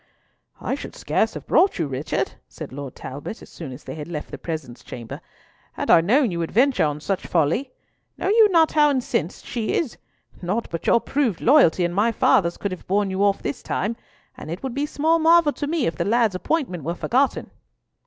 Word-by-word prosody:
"I - - -2
should - - -6
scarce - - 0
have - - -7
brought 385 - +3
you, 165 - 0
Richard," 135 +1 -2 0.2
said - - -9
Lord 140 -2 -7
Talbot, 145 +11 -7
as - - -14
soon 155 -6 -8
as 130 +3 -10
they - - -7
had 150 -2 -7
left 155 -3 -6
the - - -7
presence 155 -7 -6
chamber, 115 -2 -8 0.5
"had - - -1
I 165 - +7
known 235 - +3
you 170 - -3
would 165 - -2
venture 255 - +3
on 150 0 -2
such 190 +4 -3
folly. 170 - +1 0.5
Know - - -1
you 435 0 +6
not 330 -4 +4
how 300 -1 +4
incensed 250 - -2
she 230 -3 -2
is? 305 -9 -2 0.4
Naught 195 +6 -2
but 165 - -5
your 235 - +5
proved 265 - 0
loyalty 235 - +5
and 175 - -2
my 210 +5 +2
father's 175 -5 +2
could 200 - -3
have 185 - -8
borne 200 +1 +1
you 190 +1 0
off 200 -1 +2
this 140 - -3
time, 215 +4 -2 0.4
and - - -9
it 170 +8 -6
would 265 -2 -3
be 285 +3 -1
small 320 +3 +2
marvel 325 -2 +5
to 290 - -4
me 315 -3 0
if 165 - -1
the - - 0
lad's 225 -1 +2
appointment 185 - -2
were 170 +4 -2
forgotten." 260 +9 0
200 Hz, 215 wpm, -23 LUFS, -, 0.5 s, I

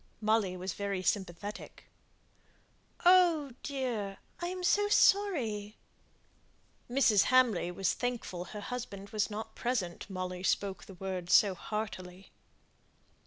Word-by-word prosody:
Molly 215 -4 +1
was 185 0 -4
very 200 -2 -3
sympathetic. 200 +2 -3 1.2
"Oh, 345 -6 +5
dear! 240 -8 -3 0.2
I 345 - -2
am 365 0 -5
so 410 +3 +3
sorry!" 250 - +2 1.1
Mrs. 240 -6 +4
Hamley 250 -9 +3
was 180 +1 0
thankful 235 -8 -3
her 210 +2 -8
husband 205 -4 -6
was 215 0 0
not 220 +1 -6
present, 210 -8 -2
Molly 185 -1 -4
spoke 190 0 -1
the 195 - -12
words 180 -1 -3
so 205 -4 +6
heartily. 185 -2 -6
210 Hz, 115 wpm, -31 LUFS, 190-250 Hz, 1.2 s, so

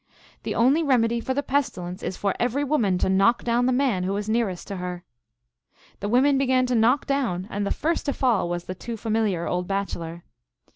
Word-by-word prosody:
" - - -28
The - - -2
only 265 +7 +4
remedy 235 -6 +2
for 260 +3 -2
the 285 - 0
pestilence 185 -11 -2
is 185 - -4
for 200 -2 0
every 250 +4 0
woman 235 -11 +1
to - - 0
knock 195 +5 +3
down 240 +1 +1
the - - +3
man 250 -7 +1
who 195 +2 -1
is 205 0 -4
nearest 215 -5 -1
her." 180 -2 -5 1.0
The 205 - -3
women 270 +4 +4
began 255 -1 +2
to 250 -1 0
knock 235 +5 +3
down, 240 -11 -1
and 205 0 -2
the - - 0
first 330 0 -1
to 280 - +1
fall 215 -10 +1
was 175 0 -3
the 185 - -5
too 230 +5 -6
familiar 215 -6 0
old 180 0 -2
bachelor. 170 -4 -4
225 Hz, 205 wpm, -24 LUFS, 185-255 Hz, 1.0 s, only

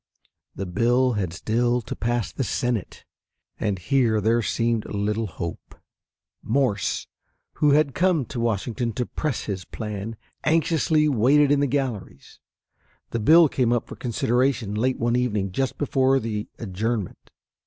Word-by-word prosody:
The 100 - -4
bill 120 +7 +2
had 95 -6 -2
still 120 +7 0
to - - -6
pass 120 -1 -1
the 135 - -3
Senate, 120 -1 -2 0.5
and 105 -3 -1
here 115 +2 +2
there 115 +3 +2
seemed 115 0 0
little 105 +2 -1
hope. 85 -1 -7 0.7
Morse, 115 -4 0 0.6
who 145 -2 +5
had 145 -2 +3
come 175 -6 +2
to 120 - -6
Washington 115 +1 -1
to 125 - -2
press 150 0 -3
his 95 -3 -4
plan, 105 +2 -6 0.3
anxiously 155 -1 +2
waited 140 +3 +4
in 145 - +4
the 140 - +2
galleries. 125 - -4 0.7
The 115 - -1
bill 160 +9 +7
came 125 -4 0
up 120 -1 +1
for - - -8
consideration 120 -1 0
late 125 +5 0
one 120 +1 0
evening 105 -6 0
just 135 +6 -2
before 135 -2 +2
the 110 -3 -4
adjournment. 110 0 -3
120 Hz, 145 wpm, -24 LUFS, 105-135 Hz, 0.7 s, bill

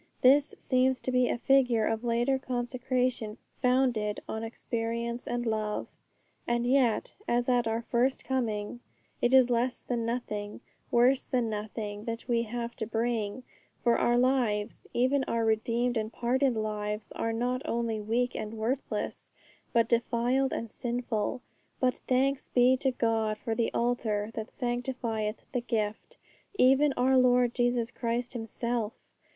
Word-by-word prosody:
This 275 +3 +5
seems 260 0 +2
to 255 - -2
be 250 -1 +3
a - - 0
figure 245 -3 +3
of 225 +1 -1
later 240 +3 +1
consecration 250 -3 -1 0.2
founded 250 -5 +2
on 220 0 -4
experience 235 +1 -3
and 240 0 -2
love. 215 -2 -1 0.6
And 240 0 +1
yet, 250 -3 +2
as 240 0 +1
at 245 -2 +2
our 225 +1 -1
first 255 +3 0
coming, 230 -4 -2 0.4
it 240 - +3
is 260 -2 +6
less 245 +2 0
than 240 -2 -2
nothing, 215 -3 -3 0.3
worse 250 +2 +4
than 240 -3 0
nothing 210 0 -5
that 230 +1 -5
we 235 -2 +2
have 235 +1 -4
to 220 - -3
bring; 225 0 -1 0.4
for 235 -1 +3
our 240 0 +3
lives, 245 -5 +1
even 260 +3 +2
our 230 -1 0
redeemed 230 +2 +1
and 215 0 -2
pardoned 250 +1 +1
lives, 210 0 -3
are 225 - -2
not 245 +3 -1
only 230 -2 -1
weak 240 +4 0
and 215 +1 -4
worthless, 240 +5 -3 0.4
but 230 -1 +3
defiled 240 +3 +1
and 230 -2 -4
sinful. 240 0 -2 0.4
But 255 -1 +1
thanks 265 +2 +1
be 250 +1 +5
to 265 +1 +1
God 225 -3 0
for 225 - -3
the 230 0 0
Altar 225 -3 0
that 220 -1 -5
sanctifieth 240 -3 -3
the 250 - -1
gift, 225 - -3 0.4
even 270 +2 +5
our 260 +1 +4
Lord 250 -1 +4
Jesus 240 -1 +1
Christ 240 +1 -2
Himself! 235 -1 -2
240 Hz, 145 wpm, -29 LUFS, 225-250 Hz, 0.6 s, is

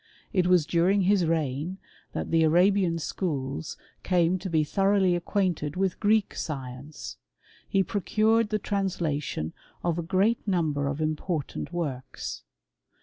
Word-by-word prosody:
It 185 -3 +3
was 180 -4 +4
during 180 +5 +3
his 190 -2 +3
reign 160 +2 -1 0.4
that - - -3
the 165 0 +4
Arabian 175 +2 +4
schools 135 - -3 0.2
came 180 0 +2
to 190 +1 -5
be 160 -2 +2
thoroughly 195 +2 +2
acquainted 175 -4 -1
with 190 -1 0
Greek 215 -1 +2
science; 135 0 -6 0.5
he 195 - +3
procured 215 +3 +2
the 215 - +1
translation 175 - -2 0.3
of 170 -1 0
a - - 0
great 195 +7 +1
number 155 -7 +1
of 140 +2 -2
important 155 0 -2
works. 145 -7 -4
175 Hz, 130 wpm, -27 LUFS, 155-195 Hz, 0.5 s, was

